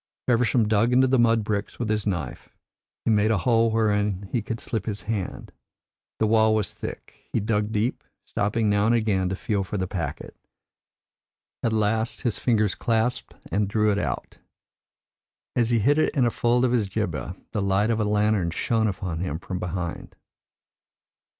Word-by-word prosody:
Feversham 120 -2 +3
dug 110 +3 +3
into 130 +1 +5
the 130 -1 +3
mud 115 -1 +4
bricks 105 -1 -3
with 120 - -2
his 105 -1 -1
knife; 90 -7 -3 0.6
he - - +3
made 105 0 +3
a 110 - +3
hole 115 +3 +3
wherein 105 -3 0
he 120 - 0
could 115 +2 -5
slip 110 -3 -3
his 105 -1 -3
hand. 105 -3 -4 0.7
The 110 - +2
wall 110 0 +4
was 105 -4 -1
thick; - - -9
he - - +1
dug 105 0 0
deep, 110 +3 -1 0.2
stopping 105 +2 -1
now 105 +1 +3
and 120 - +4
again 100 -5 +1
to 95 - -2
feel 100 +1 -1
for 100 +2 -4
the 95 - -1
packet. 85 -6 -5 1.3
At 115 - 0
last 110 +1 0
his 120 -4 -1
fingers 110 -6 +2
clasped 115 +1 -1 0.2
and 105 0 +1
drew 105 +1 +2
it 100 - 0
out; - - -4 1.2
as 120 -2 +2
he 120 - +3
hid 140 +8 +3
it - - +1
in 130 -4 +3
a 120 - +2
fold 120 +2 +2
of 125 - +1
his 115 -5 +1
jibbeh, 90 - -3 0.2
the 105 - -1
light 100 +3 +2
of 115 - 0
a - - +2
lantern 105 -3 +2
shone 110 +6 0
upon 95 -5 -3
him 85 -4 -2
from 90 +1 -5
behind." 90 -1 -5
110 Hz, 180 wpm, -25 LUFS, 100-115 Hz, 1.3 s, into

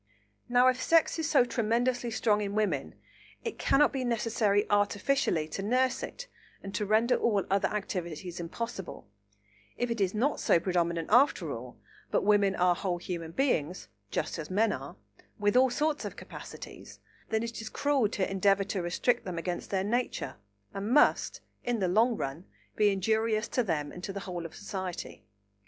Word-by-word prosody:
Now, 245 +1 +5
if 255 0 +2
sex 330 0 +3
is 320 0 -1
so 280 -5 +5
tremendously 240 +1 0
strong 220 -2 +1
in 200 0 -3
women, 185 -11 -1 0.5
it 455 - -5
cannot 295 +1 +4
be 265 -2 -1
necessary 225 -3 +1
artificially 205 - +1
to 195 - -4
nurse 255 +5 +1
it - - -6 0.4
and 195 0 -7
to 210 - -1
render 225 +4 +3
all 205 -4 +1
other 195 0 +3
activities 180 -4 -4
impossible; 195 - -6 0.7
if 245 -1 -1
it 230 -3 -2
is 195 +1 +1
not 265 +7 +1
so - - +4
predominant 170 -2 -1
after 255 +6 +4
all, - - -8 0.3
but - - +1
women 200 -1 +3
are 180 0 +4
whole 180 0 -2
human 170 -2 -5
beings, 180 - -1 0.2
just - - -2
as 155 - -6
men 215 +4 +2
are, - - -7 0.4
with 205 +1 +1
all 260 +1 +6
sorts 300 +4 0
of - - -5
capacities, - - -10 0.3
then 220 0 0
it 230 -1 -5
is 220 - -6
cruel 280 -7 +1
to 200 -3 -1
endeavour 195 +1 +2
to 195 -1 -3
restrict 175 +8 +1
them 180 -3 -5
against 175 +1 -4
their 190 -1 0
nature, 240 +5 -2 0.4
and 200 +2 -4
must, 290 +5 +3 0.2
in 240 -1 0
the 190 -4 0
long 225 +5 +3
run, 140 +7 -4 0.3
be 210 -1 +4
injurious 215 +3 +1
to 250 - 0
them 160 -9 -2
and 180 - -10
to 195 - -3
the 200 0 -5
whole 175 -3 -5
of - - -17
society. 190 -3 -6
205 Hz, 175 wpm, -29 LUFS, 185-240 Hz, 0.7 s, all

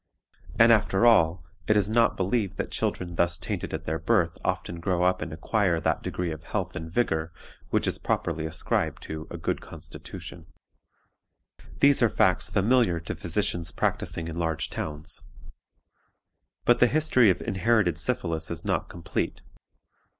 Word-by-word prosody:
And 115 +1 +7
after 105 0 +2
all, 90 -7 +4 0.2
it 105 - +4
is 100 -1 +2
not 115 0 +3
believed 100 0 -1
that - - -3
children 85 -1 -2
thus 85 0 +3
tainted - - -4
at - - -4
their 80 +1 -2
birth 90 -8 +2
often 85 - -2
grow 90 0 0
up 90 0 +2
and 80 0 -4
acquire 85 +1 0
that 80 - 0
degree 90 -2 -3
of 80 0 -7
health - - -3
and 80 +1 -6
vigor 80 -6 0 0.4
which - - +1
is - - 0
popularly 80 0 -1
ascribed 80 - -1
to 80 0 -6
a 85 - -6
good 80 - -2
constitution. 85 -1 -10 1.3
"These 140 -1 +5
are 120 - +5
facts 95 -3 +2
familiar 105 -4 +2
to 85 - -5
physicians 85 -1 -1
practicing 85 0 -2
in 85 +1 -5
large 80 -2 -1
towns. 75 +2 -5 1.4
But 120 - +4
the 125 - +6
history 135 -5 +4
of 95 - +2
inherited 105 -2 +1
syphilis 80 -1 -1
is - - -5
not - - -1
complete. 85 -1 -4
90 Hz, 155 wpm, -27 LUFS, 80-110 Hz, 1.4 s, And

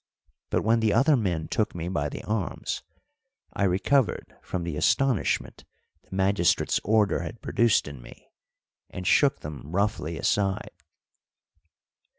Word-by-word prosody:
But - - 0
when 115 +2 +3
the 110 -2 +2
other 140 +6 +4
men 90 -9 -1
took 110 - -1
me 85 0 -4
by 75 -5 -1
the - - -7
arms, 105 -4 -3 0.7
I 100 - 0
recovered 105 +8 +1
from 90 -2 -4
the 85 -3 -4
astonishment 135 - +1 0.4
the - - -11
magistrate's 95 -2 +2
order 105 -1 +2
had 115 - -7
produced 115 -7 +2
in 70 -4 -9
me, - - -15 0.6
and 90 - -7
shook 140 +8 +3
them 75 -2 -7
roughly 95 -4 -1
aside. 95 +5 0
100 Hz, 135 wpm, -26 LUFS, 85-110 Hz, 0.7 s, other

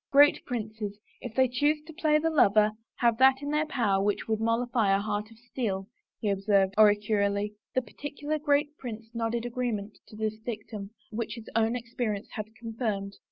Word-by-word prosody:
" - - -65
Great 285 +1 +6
princes, 215 -3 -4 0.2
if 235 -3 -7
they 260 0 +5
choose 290 +5 +2
to 320 +1 -11
play 305 -2 +3
the 325 +1 +1
lover, 215 -7 +5 0.2
have 235 -2 +2
that 265 0 +6
in 285 - -2
their 305 +1 +1
power 205 -9 +1
which 205 0 0
would 220 -1 0
mollify 230 -1 +1
a 195 - +4
heart 210 +1 -2
of 225 - -16
steel," 225 -5 -3 0.3
he 215 - -3
observed 195 -1 +2
oracularly. 205 -1 +3 0.2
The 255 - +2
particular 290 +6 -4
great 290 0 +1
prince 225 -2 -7
nodded 230 0 -1
agreement 230 -4 -3
to - - -13
this 215 0 -2
dictum 215 -3 -6 0.2
which 220 0 -3
his 230 -2 -10
own 225 +1 +3
experience 230 -3 -3
had 215 -3 -5
confirmed. 220 -4 -3
225 Hz, 180 wpm, -28 LUFS, 210-250 Hz, 0.3 s, Great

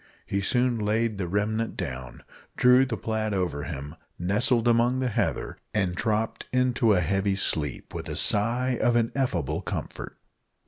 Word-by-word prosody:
He 100 - -1
soon 125 +3 +1
laid 110 0 0
the 90 - -1
remnant 110 +4 -1
down, 65 -1 -6 0.3
drew 125 +1 +6
the - - -3
plaid 110 -2 -2
over 85 -6 -2
him, 75 0 -6 0.2
nestled 115 +6 +1
among 120 +2 +3
the 130 -1 0
heather, 105 - -2 0.2
and 95 -4 +1
dropped 110 +3 -1
into 125 -3 +3
a 90 - +3
heavy 95 +3 +1
sleep 75 -7 -2
with - - -5
a - - -3
sigh 120 +4 +2
of 120 - +3
ineffable 115 - 0
comfort. - - -6
110 Hz, 150 wpm, -26 LUFS, 95-120 Hz, 0.3 s, drew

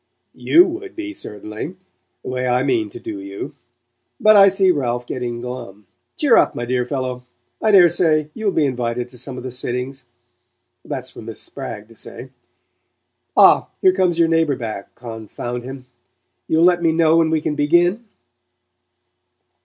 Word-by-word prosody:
"YOU 345 +2 +5
would 370 +2 -6
be, 320 -2 -5
certainly 105 - -7 0.5
the - - -6
way 130 0 -2
I 125 +1 +2
mean 120 -6 0
to - - -10
do 105 -2 -6
you. 100 0 -7 0.7
But 215 0 +6
I 195 -1 +8
see 195 -1 +3
Ralph 125 -6 -2
getting 120 -1 -4
glum. 120 -5 -8 0.3
Cheer 280 -6 +4
up, - - +3
my 120 - -3
dear 125 0 -1
fellow; 130 -2 -3 0.4
I 220 - +2
daresay 170 -5 +4
you'll 215 -3 -1
be 160 -5 +2
invited 125 -2 -2
to 125 -1 -10
some 130 0 -4
of - - -7
the 130 - -5
sittings 125 +2 -4 0.8
that's - - -5
for - - -11
Miss - - -7
Spragg 105 +1 -7
to 115 - -18
say. 125 +3 -9 1.1
Ah, - - +6
here 185 - +4
comes 185 -3 +1
your 170 -1 +4
neighbour 165 -3 +2
back, 110 -5 -7
confound 120 +1 -6
him 130 +1 -9 0.6
You'll 160 +1 +2
let 175 -1 +4
me 165 -1 +3
know 160 0 +3
when 165 -1 +3
we 160 0 +1
can 150 - -2
begin?" 175 +9 +2
135 Hz, 165 wpm, -20 LUFS, 120-175 Hz, 1.1 s, I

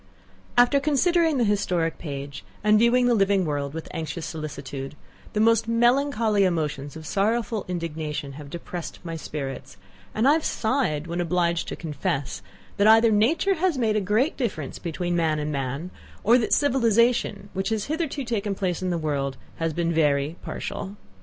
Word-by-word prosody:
After 245 +4 +5
considering 315 +2 +2
the 245 - +3
historic 185 -6 0
page, 140 -3 -6 0.2
and 210 0 +5
viewing 240 +2 +4
the 245 - +4
living 195 -3 +3
world 145 -1 -2
with 160 - -6
anxious 160 0 -4
solicitude, 145 -3 -6 0.4
the 210 - 0
most 225 0 +4
melancholy 230 -3 +3
emotions 150 -6 -1
of 160 -1 -9
sorrowful 220 +4 0
indignation 160 -5 -4
have 145 0 -10
depressed 170 +1 -6
my 165 -1 -5
spirits, 135 -10 -6 0.4
and 220 +4 +3
I 285 - +7
have 320 0 +1
sighed 220 - 0
when 170 +1 -2
obliged 170 -1 0
to - - -4
confess, 140 - -3 0.4
that 200 +1 +4
either 225 +1 +7
nature 295 - +3
has 360 -3 0
made 225 -4 +1
a 215 - +2
great 215 - +1
difference 180 - -3
between 175 +1 -2
man 160 -2 +1
and 150 0 -2
man, 140 +5 -3 0.3
or 235 +4 +5
that 225 - 0
the - - +2
civilization, 235 -6 +2
which 190 +2 -1
has 220 -2 -1
hitherto 305 -2 -2
taken 215 -4 -2
place 185 -3 -2
in 185 - -1
the 175 - 0
world, 140 -4 -2 0.2
has 165 0 -1
been 170 +1 -1
very 145 -1 +2
partial. 195 +1 -5
185 Hz, 170 wpm, -25 LUFS, 155-230 Hz, 0.4 s, I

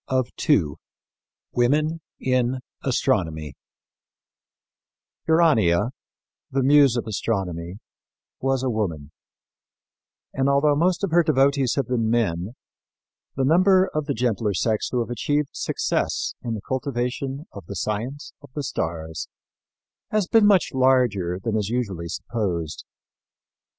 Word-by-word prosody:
CHAPTER 130 +4 +1
IV 100 - +4 0.9
WOMEN 150 +7 +1 0.2
IN 130 0 0 0.2
ASTRONOMY 80 - 0 1.7
Urania, 120 - +3 0.6
the 135 0 0
muse 140 -2 +5
of 120 - -2
astronomy, 95 -5 -3 0.6
was 135 -1 0
a 130 - +1
woman; 85 -10 -3 1.2
and, 135 +1 +1
although 145 +1 +3
most 175 +5 +1
of 195 - 0
her 175 +1 +5
devotees 140 -4 +2
have 140 -5 0
been 115 -3 0
men, 105 -2 0 0.8
the 135 - +1
number 185 +5 +4
of 155 -1 -2
the 140 - -1
gentler 110 -3 0
sex 110 +4 0
who 125 - 0
have 115 0 -4
achieved 145 +5 0
success - - -1
in 115 -2 -3
the 105 - -6
cultivation 130 +2 -2
of 100 -5 -11
the 100 - -6
science 115 +9 -4
of 145 - -14
the 145 - -2
stars 80 - -4 0.8
has 215 -2 +1
been 215 +2 +5
much 195 -5 +4
larger 125 -9 +2
than 110 +3 -2
is 105 -2 -1
usually 100 -9 -2
supposed. 85 -5 -3
125 Hz, 125 wpm, -24 LUFS, 100-140 Hz, 1.7 s, muse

